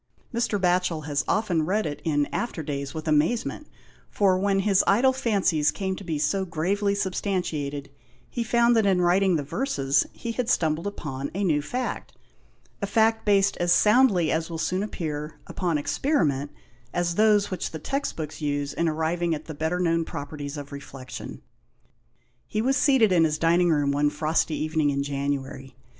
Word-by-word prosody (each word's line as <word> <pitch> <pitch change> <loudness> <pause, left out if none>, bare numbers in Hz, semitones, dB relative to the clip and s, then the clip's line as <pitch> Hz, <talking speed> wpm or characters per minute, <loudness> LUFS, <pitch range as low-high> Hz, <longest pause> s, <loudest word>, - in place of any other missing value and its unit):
Mr. 235 -3 0
Batcbel 180 -4 +1
has 145 -2 0
often 185 -7 +1
read 205 +6 0
it 145 -1 -4
in 145 -2 +1
after 205 -9 -3
days, 140 0 -4
with 155 0 -5
amazement, 165 - 0 0.4
for, 195 -3 +3
when 195 +1 +1
his 195 -1 +3
idle 250 +6 +4
fancies 195 - +1
came 190 +5 -2
to 200 - -9
be 165 -4 -2
so 150 +7 0
gravely 195 +4 0
substantiated, 165 -8 -2 0.4
he 235 - -3
found 235 +1 +3
that 220 -3 +3
in 190 -2 +3
writing 185 +1 +3
the 150 - -1
verses 140 - 0
he 235 - -5
had 240 0 -2
stumbled 165 -5 +1
upon 140 -9 -5
a 200 - -1
new 155 -6 +2
fact 250 - -4 0.4
— - - -36
a 200 - -1
fact 225 +1 +2
based 200 -1 +3
as 175 0 +1
soundly, 210 -5 +4
as 165 +1 -1
will 165 - -4
soon 185 +3 -1
appear, 155 -7 -5
upon 175 -4 -1
experiment, 145 - 0 0.4
as 175 -1 0
those 210 +1 +3
which 185 - -3
the 160 - -6
text 275 - -3
books 155 0 -6
use 145 -1 -2
in 170 -1 0
arriving 160 +2 0
at 150 - -9
the 160 - -7
better 160 +4 -2
known 165 -2 +1
properties 145 -1 -6
r;* 145 - -5
reflection. 135 -2 -9 1.0
He 215 - -2
was 260 +5 +2
seated 265 -7 +4
in 170 -3 +4
his 155 -1 +1
dining 170 +2 +3
room 145 -3 +2
one 145 +1 +2
frosty 155 +1 0
evening 155 -1 0
in 140 0 0
January. 140 -2 -4
170 Hz, 175 wpm, -25 LUFS, 150-200 Hz, 1.0 s, idle